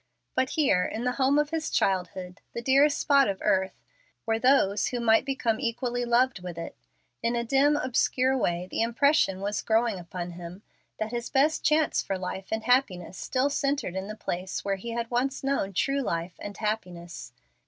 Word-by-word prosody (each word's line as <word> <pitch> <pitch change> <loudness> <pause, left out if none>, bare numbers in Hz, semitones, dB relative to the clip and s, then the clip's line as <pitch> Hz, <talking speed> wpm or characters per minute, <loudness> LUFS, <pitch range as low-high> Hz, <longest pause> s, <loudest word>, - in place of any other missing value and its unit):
But 260 0 +1
here, 225 -12 +3
in 220 +5 -3
the 250 - +1
home 270 +2 +4
of 295 0 +1
his 320 -1 -2
childhood, 180 0 -1
the 235 - -4
dearest 280 +3 +4
spot 280 -2 +4
of 195 - -2
earth, 190 -2 0 0.4
were 225 0 0
those 225 -6 +3
who 245 - -2
might 225 0 +4
become 255 -5 -1
equally 245 -1 -2
loved 240 -3 +2
with 180 -2 -7
it. 165 - -6 0.5
In 235 +1 0
a 235 - 0
dim, 275 +5 +3
obscure 260 0 +1
way 175 -7 -1
the - - -1
impression 235 -4 +2
was 205 +1 -2
growing 225 -3 +1
upon 175 0 -6
him 175 +3 -9 0.3
that 220 0 -3
his 240 0 -4
best 295 +4 +2
chance 310 0 +2
for 195 - -3
life 185 +1 -5
and 220 0 -1
happiness 235 -9 +1
still 260 +8 0
centred 275 -9 -1
in 190 +1 -3
the 215 - -6
place 185 -3 -4
where 195 -1 0
he 235 +5 -7
had 230 0 -3
once 260 +3 -1
known 275 -8 0
true 275 +9 0
life 170 -6 -2
and 205 0 -7
happiness. 180 - -4
230 Hz, 185 wpm, -27 LUFS, 190-265 Hz, 0.5 s, home